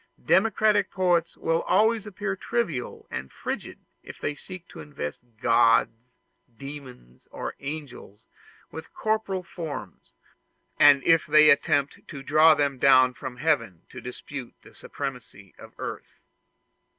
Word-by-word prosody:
Democratic 210 Hz, 0 st, +3 dB
poets 175 Hz, -3 st, 0 dB
will 165 Hz, 0 st, 0 dB
always 215 Hz, +3 st, +2 dB
appear 200 Hz, -1 st, -4 dB
trivial 185 Hz, -, -3 dB
and 65 Hz, +1 st, -6 dB
frigid -, -, -6 dB, 0.2 s
if -, -, -12 dB
they 145 Hz, -, -2 dB
seek 175 Hz, +4 st, -11 dB
to -, -, -13 dB
invest 140 Hz, -, -6 dB, 0.2 s
gods, 115 Hz, -1 st, +4 dB, 0.7 s
demons, 130 Hz, -, -11 dB
or -, -, -6 dB
angels, 135 Hz, -8 st, -8 dB, 0.5 s
with 160 Hz, -, -9 dB
corporeal 215 Hz, -4 st, -1 dB
forms, 155 Hz, -, -8 dB, 0.7 s
and 145 Hz, -2 st, +7 dB
if 165 Hz, -1 st, +3 dB
they 155 Hz, 0 st, +7 dB
attempt 140 Hz, -1 st, +1 dB
to 140 Hz, -4 st, -9 dB
draw 155 Hz, +2 st, +5 dB
them 140 Hz, -3 st, -1 dB
down 130 Hz, -1 st, +5 dB
from 125 Hz, 0 st, -8 dB
heaven 125 Hz, -, -1 dB
to 130 Hz, -, -10 dB
dispute 125 Hz, +1 st, -8 dB
the -, -, -17 dB
supremacy 125 Hz, -8 st, -8 dB
of -, -, -12 dB
earth. -, -, -7 dB
145 Hz, 125 wpm, -25 LUFS, 125-180 Hz, 0.7 s, and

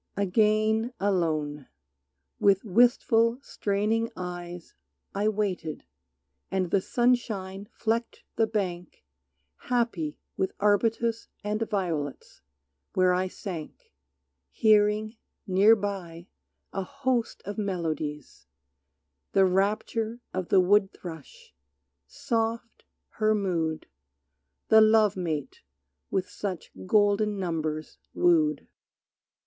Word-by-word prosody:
Again 215 Hz, +4 st, +2 dB
alone. 155 Hz, -7 st, 0 dB, 0.7 s
With 195 Hz, -1 st, +4 dB
wistful, 230 Hz, +2 st, +3 dB
straining 215 Hz, +2 st, 0 dB
eyes 175 Hz, -1 st, -7 dB, 0.4 s
I 205 Hz, +2 st, 0 dB
waited, 190 Hz, -7 st, -2 dB, 0.7 s
and 185 Hz, -2 st, -1 dB
the 195 Hz, -, +3 dB
sunshine 205 Hz, -5 st, 0 dB
flecked 230 Hz, +1 st, -2 dB
the 225 Hz, 0 st, +2 dB
bank 180 Hz, -, -4 dB, 0.6 s
Happy 230 Hz, -12 st, 0 dB, 0.2 s
with 190 Hz, -, -1 dB
arbutus 225 Hz, +3 st, +1 dB, 0.2 s
and 210 Hz, +1 st, -2 dB
violets 165 Hz, -, -3 dB, 0.5 s
where 185 Hz, -1 st, +4 dB
I 185 Hz, +1 st, +1 dB
sank 175 Hz, -, -8 dB, 0.6 s
Hearing, 215 Hz, -, +3 dB, 0.3 s
near 200 Hz, +3 st, +6 dB
by, 190 Hz, -5 st, -5 dB, 0.4 s
a 195 Hz, -, -1 dB
host 260 Hz, +1 st, -2 dB
of 205 Hz, +2 st, -5 dB
melodies, 155 Hz, -, -4 dB, 0.9 s
The 195 Hz, -1 st, +5 dB
rapture 215 Hz, +4 st, 0 dB
of 185 Hz, -2 st, -3 dB
the 195 Hz, -, +5 dB
woodthrush; 200 Hz, -, -1 dB, 0.5 s
soft 230 Hz, -1 st, -3 dB, 0.2 s
her 215 Hz, 0 st, +1 dB
mood 165 Hz, -6 st, -1 dB, 0.8 s
The 220 Hz, -, +8 dB
love 215 Hz, -2 st, +5 dB
mate, 155 Hz, -7 st, -4 dB, 0.5 s
with 190 Hz, -1 st, -1 dB
such 190 Hz, -4 st, -5 dB, 0.2 s
golden 205 Hz, +1 st, +3 dB
numbers 155 Hz, -4 st, -3 dB, 0.2 s
woo'd. 155 Hz, -4 st, +3 dB
200 Hz, 90 wpm, -27 LUFS, 175-220 Hz, 0.9 s, The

